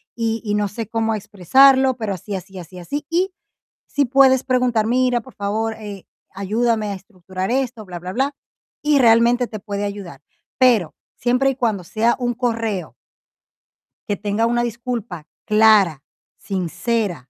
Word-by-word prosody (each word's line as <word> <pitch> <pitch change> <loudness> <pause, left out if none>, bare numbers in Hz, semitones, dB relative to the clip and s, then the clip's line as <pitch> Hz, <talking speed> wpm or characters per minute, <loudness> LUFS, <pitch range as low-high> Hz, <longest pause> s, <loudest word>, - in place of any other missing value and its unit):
Y 225 -1 -1
y 205 - -1
no 205 -1 +1
sé 220 +1 -6
cómo 225 0 -1
expresarlo, 260 +7 +4
pero 215 -4 -2
así, 195 +2 -6
así, 190 +1 -8
así, 180 +1 -10
así. 285 - -5
Y 365 +3 +1 0.6
sí 285 -1 +1
puedes 260 0 +4
preguntar: 250 -4 +1
"Mira, 250 0 +2
por 260 - -16
favor, 220 +2 -2
eh, 205 -3 -8 0.3
ayúdame 215 +2 0
a - - -2
estructurar 185 0 -6
esto, 250 -4 -1
bla 175 -2 -7
bla 180 +2 -7
bla". 275 +3 0 0.5
Y 295 -1 +3
realmente 235 +1 +4
te 215 - -7
puede 200 0 -4
ayudar. 195 -9 -7 0.4
Pero 230 -11 +3 0.2
siempre 250 +3 +2
y - - -6
cuando 220 -7 -1
sea 230 +6 +1
un 245 -1 -1
correo 225 -7 -2 1.1
que 205 - 0
tenga 210 +2 0
una 240 +1 +1
disculpa 230 -8 -5 0.2
clara, 210 -9 +4 0.3
sincera 180 - -2
220 Hz, 155 wpm, -20 LUFS, 195-245 Hz, 1.1 s, expresarlo